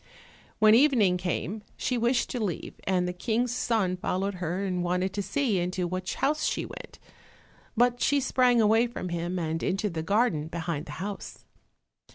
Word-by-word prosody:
When 215 -1 +6
evening 230 -8 +5
came 180 +3 -3 0.2
she 250 - -1
wished 240 +1 +1
to 245 -3 -2
leave, 180 -6 -3
and 180 -2 +1
the 180 - -2
King's 230 +6 -1
son 215 -7 0
followed 190 +2 -1
her 180 +3 -2
and 180 -2 -1
wanted 180 +2 0
to 205 - -1
see 210 +1 0
into 180 +1 -1
which 185 +1 -3
house 305 +2 0
she - - 0
went. - - -10 0.8
But 245 +1 +3
she 285 0 +3
sprang 250 -2 +3
away 225 +2 +4
from 230 -6 -6
him, 175 +1 -2
and 165 -1 -2
into 195 +2 -1
the 160 -1 -3
garden 200 -4 +1
behind 165 -1 -4
the - - -7
house. 200 -1 -7
195 Hz, 175 wpm, -27 LUFS, 180-235 Hz, 0.8 s, When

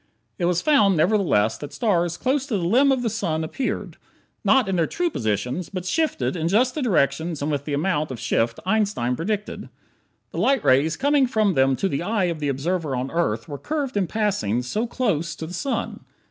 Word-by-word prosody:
It 175 - +1
was 175 0 +1
found, 210 - +4
nevertheless, 160 - +2
that 145 -1 -8
stars 175 -7 0
close 270 +1 0
to 225 -7 0
the 180 - -3
limb 265 +10 +4
of 260 -2 +1
the - - 0
sun 170 -8 -1
appeared, 250 +11 -4 0.5
not 265 -5 +4
in 195 - 0
their 165 -3 +2
true 350 -1 -1
positions, 125 - -2
but 185 -2 -5
shifted 185 - 0
in 165 -1 -1
just 240 +8 +2
the 305 - -3
directions 160 - +1
and 150 - -1
with 145 -1 -2
the 145 - -2
amount 155 -1 0
of 130 -3 -6
shift 115 -1 0
Einstein 200 - +1
predicted. 205 - -4 0.6
The - - -5
light 270 -4 +2
rays 140 +6 +3
coming 280 -1 +3
from 215 -5 +2
them 135 -2 +3
to 195 - 0
the 140 -5 -2
eye 205 +2 0
of 160 - -10
the 145 -1 -1
observer 150 +1 -1
on 125 +2 -3
Earth 115 -10 -1
were 145 -2 -6
curved 290 -5 -3
in 195 -3 +1
passing 155 - 0
so 215 - -2
close 170 - -1
to 160 - -6
the 170 - -8
sun. 275 +7 -3
175 Hz, 205 wpm, -23 LUFS, 145-220 Hz, 0.6 s, found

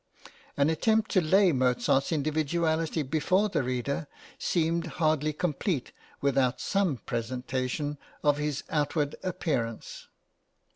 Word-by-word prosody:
An 145 +2 +3
attempt 220 +6 +2
to 185 - +4
lay 185 +3 +4
Mozart's 130 +1 +2
individuality 160 +1 0
before 185 +9 +1
the 190 - 0
reader 130 +4 -2 0.3
seemed 170 0 0
hardly 155 -2 +2
complete 150 - -2 0.3
without 135 -3 +2
some 195 -9 +1
presentation 130 +5 -3 0.2
of 145 -1 +4
his 150 -1 -2
outward 145 -1 0
appearance. 140 - -3
150 Hz, 105 wpm, -28 LUFS, 135-170 Hz, 0.3 s, to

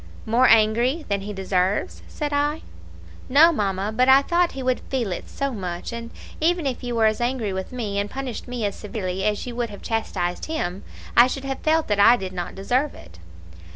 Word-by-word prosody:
"'More 235 +3 +4
angry 235 +7 +3
than 200 -1 0
he 205 +2 -6
deserves?' 190 0 -1
said 295 -1 -4
I. 295 +2 0 0.7
"'No, 305 +6 +7
mamma; 200 - -1
but 255 +2 +3
I 270 +1 +7
thought 345 +2 +1
he 270 - -5
would 255 0 +1
feel 245 -7 -1
it 175 - -5
so 275 -1 -2
much: 180 -1 -5
and 230 0 -6 0.3
even 335 0 +1
if 260 -2 -2
you 245 -1 -3
were 225 -1 +3
as 215 +1 +1
angry 240 -5 -1
with 190 0 -5
me, 215 -5 -3
and 205 0 -2
punished 265 -2 -5
me 245 -3 -3
as 200 - -2
severely 190 -4 -4
as 210 -1 0
you 245 -1 -6
would 240 -2 -1
have 205 - -11
chastised 180 -6 -2
him, 190 - -3 0.3
I 240 - +8
should 270 +1 -4
have 270 -1 -3
felt 315 0 +1
that 205 -1 0
I 235 +4 +7
did 190 -4 -6
not 175 -1 -5
deserve 250 +9 0
it.'' 85 0 -14
230 Hz, 210 wpm, -23 LUFS, 200-265 Hz, 0.7 s, I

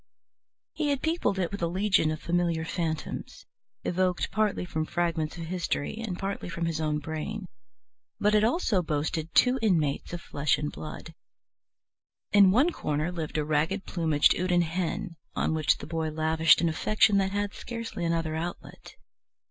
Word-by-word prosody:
He 305 -1 -1
had 280 -2 -1
peopled 320 - +1
it 180 -3 -1
with 200 - -5
a 170 - +2
legion 185 -2 +2
of 155 0 -3
familiar 170 -1 0
phantoms, 160 -2 -4 0.4
evoked 180 0 0
partly 215 -4 0
from 160 -3 -2
fragments 165 -1 -1
of 165 - -5
history 175 -2 -2
and 220 -6 -4
partly 195 -1 -4
from 170 0 -3
his 165 -1 -1
own 155 -1 0
brain, 160 +7 -4 0.7
but 210 +1 +3
it 210 0 +4
also 230 - +2
boasted 155 +1 -2
two 255 +1 +5
inmates 165 -10 +1
of 175 - -4
flesh 150 -3 0
and 150 0 -3
blood. 155 +1 -8 1.2
In 200 -2 +7
one 260 - +4
corner 155 - -2
lived 160 -3 -4
a 150 - 0
ragged 160 +6 0
plumaged 160 -4 +3
Houdan 180 -1 +2
hen, 175 +2 -3 0.2
on - - +1
which 155 -1 +2
the - - -8
boy 160 0 -2
lavished 160 0 +4
an 170 - +2
affection 210 +4 +3
that 190 0 +1
had 205 +1 -2
scarcely 230 -6 -5
another 165 -2 0
outlet. 170 +2 -6
170 Hz, 165 wpm, -28 LUFS, 160-200 Hz, 1.2 s, In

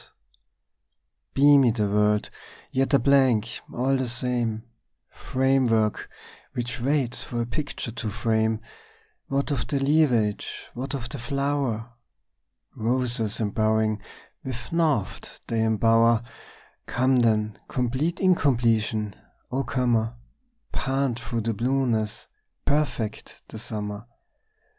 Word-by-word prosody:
Beamy 140 -2 +6
the 110 -2 0
world, 105 +1 +2 0.4
yet 135 +2 +1
a - - +8
blank 130 -4 +3
all 130 +3 +1
the 130 -2 -2
same, 120 -2 -1 0.5
Framework 130 -5 +1 0.4
which 120 0 -4
waits 130 -2 0
for 120 - -4
a 115 - 0
picture 130 0 -4
to 115 -1 -4
frame: 110 0 0 0.7
What 140 +1 -1
of 140 - -1
the 140 - 0
leafage, 135 -8 +1
what 135 +3 -4
of 120 -3 -5
the 140 - -6
flower? 135 -3 -1 0.8
Roses 120 -2 0
embowering 110 0 +1 0.4
with 120 -2 -6
naught 155 - -1
they 115 - -1
embower! 115 +1 +4 0.6
Come 130 +1 +2
then, 110 -3 +2
complete 130 +7 -1
incompletion, 115 - +2 0.4
O 135 +2 0
comer, 120 -2 0 0.6
Pant 135 -3 -1
through 115 0 -3
the 115 +1 -1
blueness, 115 -2 0 0.4
perfect 140 -7 -1
the 110 - -8
summer! 105 -1 -5
120 Hz, 105 wpm, -25 LUFS, 110-135 Hz, 0.8 s, a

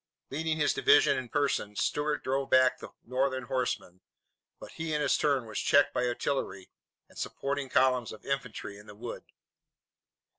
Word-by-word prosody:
Leading 160 +3 -1
his 150 - +2
division 430 +1 +5
in 125 -2 -4
person, 140 -8 0
Stuart 150 +6 0
drove 135 +1 -1
back 130 -1 +4
the - - -9 0.2
Northern 130 +1 0
horsemen, 120 -8 -3 0.6
but - - -10
he 160 -1 -3
in - - +1
his 145 -2 +2
turn 140 -5 +1
was 110 -1 -4
checked 145 -2 +4
by 125 - +1
artillery 120 -6 -3 0.4
and - - -13
supporting 140 -1 -3
columns 130 -3 +2
of 110 - -11
infantry 125 -7 -4
in 105 - -15
the 105 - -11
wood. 115 +3 -7
130 Hz, 160 wpm, -30 LUFS, 120-145 Hz, 0.6 s, division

